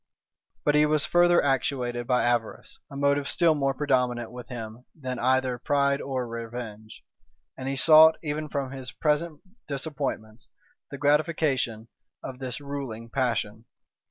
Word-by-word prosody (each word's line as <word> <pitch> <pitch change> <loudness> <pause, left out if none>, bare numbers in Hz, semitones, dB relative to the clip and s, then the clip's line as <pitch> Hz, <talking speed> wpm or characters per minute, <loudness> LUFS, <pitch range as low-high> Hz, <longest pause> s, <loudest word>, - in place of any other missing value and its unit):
But 150 - +4
he 150 0 +4
was 150 -1 +2
further 175 0 +4
actuated 125 -3 -1
by 125 -1 +2
avarice, 120 -2 -2
a - - -10
motive 140 0 +1
still 170 -2 +3
more 135 -2 0
predominant 125 -4 0
with 125 -2 -9
him 115 0 -8
than 130 -3 -4
either 130 0 +1
pride 140 +1 +1
or 130 -3 -3
revenge; 115 -2 -8 0.5
and 130 0 -5
he 135 - -2
sought, 160 +3 +7
even 150 0 -3
from 140 -2 -3
his 130 -2 -7
present 155 +1 -1 0.3
disappointments, 135 -6 -5 0.4
the 140 - -7
gratification 145 -6 +1 0.4
of 130 -1 -7
this 130 -1 -5
ruling 135 -6 -6
passion. 115 -4 -1
135 Hz, 140 wpm, -26 LUFS, 120-145 Hz, 0.5 s, sought